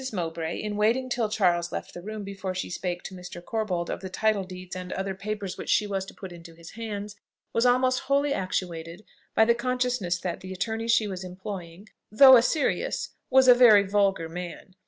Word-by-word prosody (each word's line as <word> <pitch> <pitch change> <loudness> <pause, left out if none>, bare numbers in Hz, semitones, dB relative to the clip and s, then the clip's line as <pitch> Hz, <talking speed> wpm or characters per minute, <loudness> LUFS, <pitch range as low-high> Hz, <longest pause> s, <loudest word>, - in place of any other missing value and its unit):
Mowbray, 165 -4 -3
in 210 -1 -4
waiting 235 +5 +2
till 235 -3 0
Charles 175 -5 +1
left - - -6
the 175 - -8
room 215 +2 -6
before 195 -1 -5
she 185 - -4
spake 180 0 -3
to - - -8
Mr. 180 -1 -9
Corbold 180 -3 -2
of - - -4
the 190 - -7
title 215 +1 +1
deeds 185 -1 -9
and 180 0 -6
other 195 0 -3
papers 200 0 -5
which - - -6
she 210 - +3
was 195 -2 -2
to - - -11
put 190 -2 -9
into 170 -1 -12
his 170 0 -12
hands, 210 -2 -6 0.4
was 230 +2 +3
almost 255 +1 +3
wholly 280 +1 +1
actuated 175 -2 -4 0.3
by 220 - +6
the 235 - +4
consciousness 245 -7 -1
that 180 -1 -4
the 185 - -9
attorney 220 +4 -3
she 230 -1 +3
was 190 -2 -5
employing 185 0 -8 0.2
(though 260 +4 +9
a 235 - +7
serious) 315 - 0 0.2
was 265 0 +5
a 250 - +10
very 235 -5 +7
vulgar 195 -3 +1
man. 175 +2 -8
195 Hz, 200 wpm, -26 LUFS, 180-225 Hz, 0.4 s, a